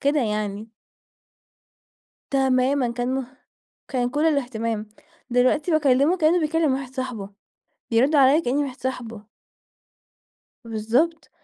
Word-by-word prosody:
كده 285 +1 +2
يعني. 210 -1 -3 1.6
تمامًا 265 -1 +2
كان 245 +2 -2
مه 265 0 -5 0.5
كان 245 -2 0
كل 295 +3 +1
الاهتمام، 230 -7 -1 0.4
دلوقتي 255 +7 +2
باكلّمه 295 +2 +3
كأنّه 335 +1 +3
بيكلّم 310 -2 +1
واحد 265 -1 -6
صاحبه، 240 -7 -5 0.6
يرد 265 +7 +3
عليّا 275 +2 +6
كأني 285 -1 0
واحد 265 -2 -6
صاحبه. 230 -5 -5 1.4
بالضبط، 235 +9 -1
260 Hz, 105 wpm, -23 LUFS, 235-290 Hz, 1.6 s, عليّا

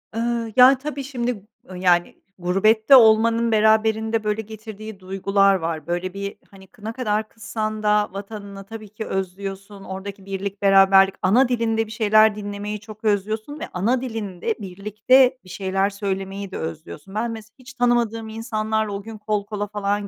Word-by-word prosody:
Iıı, 230 -1 -2
yani, 260 +2 +8
tabii, 280 0 -5
şimdi, 245 -6 -3 0.3
ııı, 185 - -8
yani, 175 -1 +1 0.2
gurbette 215 +7 +4
olmanın 230 0 +5
beraberinde 220 +1 +2
böyle 210 +1 -1
getirdiği 215 -1 -10
duygular 195 +1 +2
var. 165 -3 -4
Böyle, 175 +1 -2
bir, 200 0 -5
hani, 190 -1 -15
kı 205 +2 -16
ne 225 - -3
kadar 215 -4 -1
kızsan 215 -1 -4
da 210 -1 +2
vatanına 200 0 -8
tabii 215 0 -10
ki 215 +1 -7
özlüyorsun, 195 +1 -5
oradaki 195 +1 -8
birlik 195 0 -5
beraberlik, 195 -1 +6
ana 240 +7 +4
dilinde 225 -2 0
bir 215 - -12
şeyler 215 -1 +4
dinlemeyi 205 0 -5
çok 215 +1 -13
özlüyorsun 215 +7 -1
ve - - -5
ana 230 +8 +1
dilinde 220 -4 -3
birlikte 215 +7 +2
bir 185 - -16
şeyler 195 +1 -1
söylemeyi 195 -1 -4
de - - -5
özlüyorsun. 160 +3 -7
Ben 230 +2 -1
mesela 220 0 -9
hiç 260 +1 -13
tanımadığım 235 -3 0
insanlarla 220 -1 -2
o 200 - -4
gün 220 +1 -9
kol 210 -1 -2
kola 205 0 -4
falan 205 0 -2
210 Hz, 160 wpm, -22 LUFS, 195-225 Hz, 0.3 s, yani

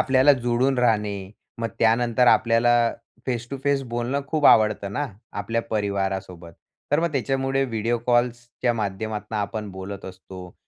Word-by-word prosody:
आपल्याला 130 +2 +5
जुळून 125 +2 +2
राहणे. 105 -5 0 0.3
मग 115 0 -2
त्यानंतर 120 +2 +3
आपल्याला 120 0 +4 0.3
फेस 120 -2 -2
टू 140 - -3
फेस 140 -1 +2
बोलणं 120 +3 -2
खूप 155 -2 +2
आवडतं 105 -2 +4
ना, 145 +7 -1 0.3
आपल्या 115 0 -2
परिवारासोबत. 95 -5 -2 0.4
तर 145 +3 +3
मग 170 -1 0
त्याच्यामुळे 135 0 0
व्हिडिओ 115 -1 -1
कॉल्सच्या 120 0 0
माध्यमातनं 110 +1 -3
आपण 105 0 -3
बोलत 95 +1 -7
असतो. 95 -1 -10
115 Hz, 135 wpm, -24 LUFS, 100-125 Hz, 0.4 s, आपल्याला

